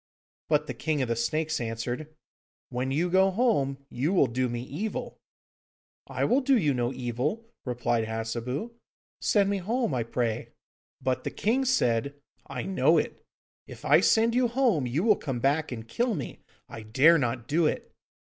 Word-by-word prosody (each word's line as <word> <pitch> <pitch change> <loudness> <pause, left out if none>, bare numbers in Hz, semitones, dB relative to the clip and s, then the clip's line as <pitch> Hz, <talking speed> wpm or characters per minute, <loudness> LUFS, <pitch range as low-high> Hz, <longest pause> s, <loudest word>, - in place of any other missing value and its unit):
But 150 -1 +2
the - - -5
King 155 -4 -1
of 125 - -3
the 115 - +1
Snakes 155 +7 -1
answered, 120 +6 -4 0.6
'When 125 +1 -2
you 155 +6 +1
go 190 +2 +4
home, 145 - 0
you 145 +9 0
will 175 - +5
do 125 0 -1
me 120 0 -4
evil!' 220 - -5 0.9
'I - - -1
will 265 +3 +3
do 270 0 +4
you 150 -9 +2
no 120 -1 0
evil,' 130 - -3 0.2
replied 120 -2 0
Hassebu; 115 - -3 0.5
'send 200 -2 +3
me 200 0 0
home, 230 - -1
I 125 - 0
pray.' 115 -1 -2 0.5
But 130 -1 0
the - - -2
king 250 +6 0
said, 140 - +1 0.3
'I 130 -3 -4
know 195 - +3
it. - - -2 0.4
If - - -11
I - - +6
send 230 +1 +3
you 250 0 +3
home, 235 - +1
you 140 +9 -1
will 215 -2 +4
come 135 -5 -4
back, 145 +5 +1
and 115 -2 -6
kill 235 - 0
me. 140 - -6 0.3
I 115 - -8
dare 135 +10 +5
not 120 -2 -2
do 160 +1 +3
it. - - -3
140 Hz, 175 wpm, -27 LUFS, 120-200 Hz, 0.9 s, I